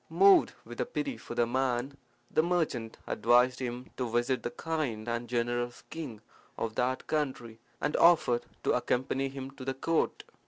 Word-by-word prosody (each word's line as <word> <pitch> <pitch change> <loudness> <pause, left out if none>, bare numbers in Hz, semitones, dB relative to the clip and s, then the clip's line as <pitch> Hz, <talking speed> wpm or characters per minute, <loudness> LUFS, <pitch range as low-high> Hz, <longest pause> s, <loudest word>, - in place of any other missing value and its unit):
Moved 390 -3 +6
with - - -5
pity 280 -3 -1
for 120 - -8
the 120 0 +3
man, 130 +2 0 0.4
the - - +4
merchant 160 -10 -1
advised 125 +2 +3
him 125 0 -5
to 125 -2 -1
visit 120 +3 +1
the - - -2
kind 135 -9 -3
and 120 0 -2
generous 120 0 -1
king 140 -10 -6 0.4
of 110 -1 -2
that 125 +3 0
country, 130 -7 -2 0.2
and 150 - -1
offered 160 -8 +5 0.2
to - - +2
accompany 135 +2 0
him 135 0 -7
to 135 -1 -10
the 135 0 -2
court. 165 +4 0
130 Hz, 160 wpm, -30 LUFS, 120-150 Hz, 0.4 s, Moved